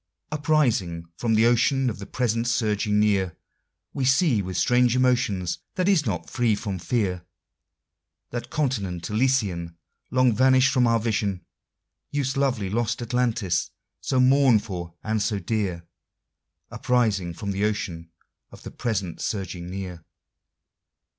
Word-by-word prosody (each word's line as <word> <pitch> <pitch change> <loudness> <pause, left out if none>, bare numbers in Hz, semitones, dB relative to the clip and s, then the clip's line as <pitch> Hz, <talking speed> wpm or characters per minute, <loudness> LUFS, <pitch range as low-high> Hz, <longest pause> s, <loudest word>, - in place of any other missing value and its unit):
Uprising 130 - +1
from 115 +4 0
the 110 +1 +4
ocean 125 +3 +3
of 110 -5 -3
the 100 - -8
present 115 -2 -1
surging 105 -3 +1
near, 100 -5 +1 0.6
We 135 - -2
see, 135 - +3
with 95 -1 -4
strange 125 0 +3
emotion, 125 -7 +1 0.3
that 185 0 0
is 175 -9 +3
not 90 -6 -2
free 120 -4 +1
from 100 -2 -4
fear, 95 -4 -1 1.1
That 120 0 -5
continent 100 - -2
Elysian 105 -9 0 0.3
Long 130 -2 +3
vanished 130 +2 +4
from 125 -3 +3
our 115 0 +3
vision, 105 -4 -1 0.6
Youth's 140 -2 -1
lovely 125 -9 0
lost 120 +2 -1
Atlantis, 120 -5 0 0.3
so 130 - 0
mourned 130 -4 +5
for 90 -6 -6
and 110 -1 -1
so 105 0 0
dear, 95 -3 -2 0.9
Uprising 105 -9 0
from 100 +2 -4
the 100 +1 -2
ocean 85 -6 -3 0.4
of - - -14
the - - -8
present 100 -8 -3
surging 90 -4 -4
near. 90 -3 -6
110 Hz, 135 wpm, -25 LUFS, 95-125 Hz, 1.1 s, mourned